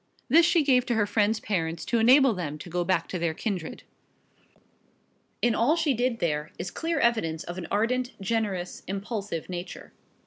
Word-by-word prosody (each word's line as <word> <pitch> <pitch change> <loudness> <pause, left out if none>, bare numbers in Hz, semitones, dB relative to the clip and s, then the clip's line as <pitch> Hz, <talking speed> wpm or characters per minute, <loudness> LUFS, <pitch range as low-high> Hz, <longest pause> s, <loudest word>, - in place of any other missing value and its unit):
This 330 +6 +6
she 335 -3 +3
gave 255 -3 +4
to 240 - +1
her 215 -2 +2
friend's 210 +1 +1
parents 165 -6 -2
to 235 - +1
enable 255 +2 +6
them 155 -6 -4
to 170 +3 -10
go 175 +1 0
back 185 +2 0
to 180 - -3
their 165 -1 -1
kindred. 185 -6 -4 1.6
In 240 -1 +4
all 235 +8 +3
she 320 -4 +1
did 245 0 0
there 150 -5 -1
is 180 - -5
clear 330 -2 -2
evidence 190 - +1
of 175 +1 -6
an 170 - -6
ardent, 245 +4 -1
generous, 195 -3 -2
impulsive 200 -3 -4
nature. 180 0 -7
205 Hz, 175 wpm, -27 LUFS, 175-245 Hz, 1.6 s, This